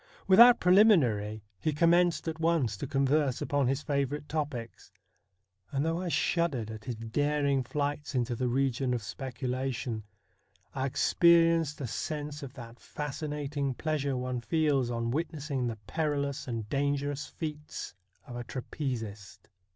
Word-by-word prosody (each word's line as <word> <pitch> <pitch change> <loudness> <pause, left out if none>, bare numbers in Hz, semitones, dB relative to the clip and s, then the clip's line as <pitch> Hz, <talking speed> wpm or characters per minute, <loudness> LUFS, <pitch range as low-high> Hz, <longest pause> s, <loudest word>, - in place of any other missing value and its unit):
Without 235 +6 +8
preliminary, 130 - +4 0.2
he 155 - 0
com 165 +3 +4
menced 175 -1 +3
at 160 0 -3
once 160 -10 +1
to 115 - -5
converse 140 0 +1
upon 140 -3 +1
his 135 +3 0
favourite 145 +1 -1
topics; 140 - -4 0.8
and 140 +2 0
though 165 +2 0
I 185 - -3
shuddered 150 -7 0
at 110 -1 -9
his 125 -2 -3
daring 140 +5 0
flights 145 +2 -3
into 120 -1 0
the 125 +2 -1
region 130 0 +1
of 115 - -4
speculation, 125 0 -3 0.7
I 135 0 -1
experienced 165 +1 +4
a - - -2
sense 150 +4 -4
of 135 -2 -8
that 120 -1 -10
fascinating 145 -2 -3
pleasure 145 -3 -1
one 125 -1 -3
feels 140 -2 +1
on 115 -1 -2
witnessing 145 -3 -2
the 115 -2 -4
perilous 140 -2 -2
and 115 -3 -4
dangerous 140 +2 -1
feats 150 -2 -6 0.3
of 120 - -9
a 120 - -4
trapezist. 115 -7 -6
140 Hz, 140 wpm, -30 LUFS, 125-150 Hz, 0.8 s, Without